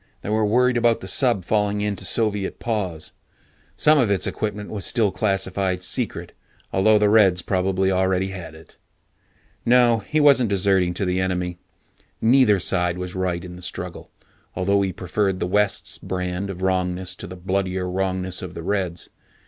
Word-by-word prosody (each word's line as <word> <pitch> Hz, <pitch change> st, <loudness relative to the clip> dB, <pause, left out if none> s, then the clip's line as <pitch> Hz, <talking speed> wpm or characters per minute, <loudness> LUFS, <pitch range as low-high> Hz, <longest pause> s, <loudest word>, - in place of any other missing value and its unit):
They -, -, -5 dB
were 110 Hz, +1 st, +1 dB
worried 125 Hz, +3 st, +3 dB
about 115 Hz, -1 st, +2 dB
the 95 Hz, -, -7 dB
sub 115 Hz, -1 st, +2 dB
falling 105 Hz, 0 st, 0 dB
into 105 Hz, -1 st, -3 dB
Soviet 105 Hz, -4 st, 0 dB
paws. 95 Hz, -9 st, -3 dB, 0.7 s
Some 155 Hz, 0 st, +5 dB
of 120 Hz, -6 st, +2 dB
its 100 Hz, -2 st, +1 dB
equipment 105 Hz, -1 st, -4 dB
was 100 Hz, -3 st, -4 dB
still 110 Hz, -5 st, +1 dB
classified 95 Hz, -1 st, -1 dB
"secret", -, -, -3 dB, 0.4 s
although 105 Hz, +3 st, +4 dB
the 105 Hz, 0 st, +3 dB
Reds 100 Hz, -5 st, +4 dB
probably 95 Hz, 0 st, 0 dB
already 95 Hz, 0 st, +1 dB
had 85 Hz, -4 st, -8 dB
it. 80 Hz, -, -17 dB, 0.9 s
No, 120 Hz, -1 st, +4 dB
he 155 Hz, +9 st, -1 dB
wasn't 140 Hz, -6 st, +5 dB
deserting 95 Hz, -2 st, +1 dB
to 100 Hz, -, -1 dB
the 90 Hz, 0 st, 0 dB
enemy. 90 Hz, -1 st, -2 dB, 0.6 s
Neither 115 Hz, -3 st, +4 dB
side 90 Hz, 0 st, 0 dB
was 90 Hz, 0 st, -5 dB
right 90 Hz, -2 st, -2 dB
in 90 Hz, -1 st, -9 dB
the -, -, -11 dB
struggle, -, -, -6 dB, 0.5 s
although 100 Hz, +2 st, +1 dB
he 95 Hz, -1 st, 0 dB
preferred 95 Hz, +2 st, -1 dB
the -, -, -1 dB
West's 105 Hz, +2 st, 0 dB
brand 90 Hz, +1 st, -3 dB
of 95 Hz, -1 st, -6 dB
wrongness 90 Hz, -1 st, -1 dB
to -, -, -8 dB
the 90 Hz, -, -8 dB
bloodier 95 Hz, 0 st, -2 dB
wrongness 95 Hz, 0 st, -2 dB
of 90 Hz, -1 st, -8 dB
the 85 Hz, -, -6 dB
Reds. 90 Hz, -3 st, -2 dB
95 Hz, 165 wpm, -22 LUFS, 90-105 Hz, 0.9 s, Some